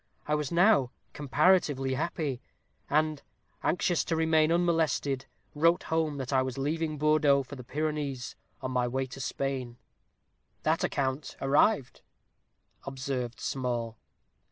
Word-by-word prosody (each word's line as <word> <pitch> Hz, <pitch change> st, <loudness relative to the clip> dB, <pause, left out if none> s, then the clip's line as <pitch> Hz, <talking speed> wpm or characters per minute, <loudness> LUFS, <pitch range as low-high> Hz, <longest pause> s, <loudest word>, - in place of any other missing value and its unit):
I 150 Hz, -, -1 dB
was 150 Hz, -2 st, -1 dB
now 175 Hz, -, +4 dB, 0.2 s
comparatively 145 Hz, -2 st, +2 dB
happy, 145 Hz, -3 st, -2 dB, 0.5 s
and, 155 Hz, 0 st, +1 dB, 0.4 s
anxious 175 Hz, 0 st, +1 dB
to 165 Hz, -, 0 dB
remain 160 Hz, -1 st, +3 dB
unmolested, 165 Hz, -6 st, +1 dB, 0.3 s
wrote 165 Hz, +3 st, +3 dB
home 160 Hz, -2 st, 0 dB
that 135 Hz, 0 st, -4 dB
I 130 Hz, -, +4 dB
was 130 Hz, -1 st, -3 dB
leaving 155 Hz, +2 st, -1 dB
Bordeaux 150 Hz, -2 st, +3 dB
for 135 Hz, +2 st, -9 dB
the 125 Hz, -, -9 dB
Pyrenees, 145 Hz, -2 st, -3 dB, 0.3 s
on 130 Hz, -, -2 dB
my 125 Hz, -1 st, +1 dB
way 130 Hz, +2 st, -1 dB
to 130 Hz, +1 st, -9 dB
Spain." 130 Hz, -3 st, -3 dB, 0.9 s
"That -, -, +1 dB
account 135 Hz, +2 st, -2 dB
arrived," 140 Hz, -, +2 dB, 0.9 s
observed 130 Hz, -3 st, -4 dB
Small. 120 Hz, -4 st, -3 dB
140 Hz, 125 wpm, -29 LUFS, 130-155 Hz, 0.9 s, now